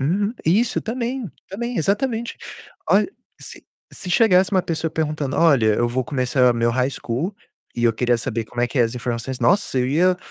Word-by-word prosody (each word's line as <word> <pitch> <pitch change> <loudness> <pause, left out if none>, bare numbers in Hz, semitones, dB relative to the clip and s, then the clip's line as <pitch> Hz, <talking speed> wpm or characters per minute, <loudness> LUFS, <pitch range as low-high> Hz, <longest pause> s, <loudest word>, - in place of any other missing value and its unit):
Uhum. 200 - 0
Isso, 210 +9 +2
também, 240 0 -3 0.2
também, 235 +4 -4
exatamente. 230 - -1 0.5
Olh 205 +2 +4 0.3
se - - -11 0.3
se 180 - -8
chegasse 190 -4 +4
uma 190 -3 +2
pessoa 160 -1 -2
perguntando: 155 -3 -2
"Olha, 130 -10 +4
eu 120 +2 +1
vou 125 +1 -1
começar 125 0 +2
meu 115 0 +1
high 130 +3 0
school 140 - -3 0.4
e 120 - -1
eu 115 - +4
queria 120 +1 +1
saber 115 -2 -3
como 120 +2 -6
é 120 - +3
que 125 - -4
é - - +6
as 115 +1 -1
informações." 125 +1 -4
Nossa, 135 - +2
eu 125 - +1
ia 180 +5 +3
150 Hz, 185 wpm, -21 LUFS, 120-195 Hz, 0.5 s, é